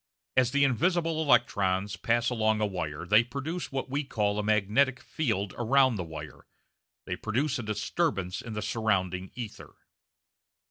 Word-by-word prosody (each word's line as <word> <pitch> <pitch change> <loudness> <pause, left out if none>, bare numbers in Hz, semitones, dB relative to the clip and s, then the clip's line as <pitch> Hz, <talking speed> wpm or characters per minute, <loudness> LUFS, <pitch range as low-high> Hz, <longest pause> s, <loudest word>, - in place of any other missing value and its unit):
As 130 -2 +4
the 140 +2 +2
invisible 165 - +1
electrons 105 -8 +2
pass 120 +1 +1
along 110 -2 +1
a 105 - +2
wire 85 -6 -4
they 105 +5 +5
produce 140 +8 -5
what 135 -1 -3
we 140 +3 -1
call 105 -6 -1
a - - -1
magnetic 110 +6 +2
field 110 -10 -2
around 130 +1 +4
the 95 - -3
wire, 80 -2 -9 0.6
they - - -3
produce 130 +5 -1
a - - -2
disturbance 105 - -1
in 115 - -7
the 105 -1 -3
surrounding 95 -5 0
ether. 120 -4 -8
110 Hz, 150 wpm, -28 LUFS, 100-135 Hz, 0.6 s, they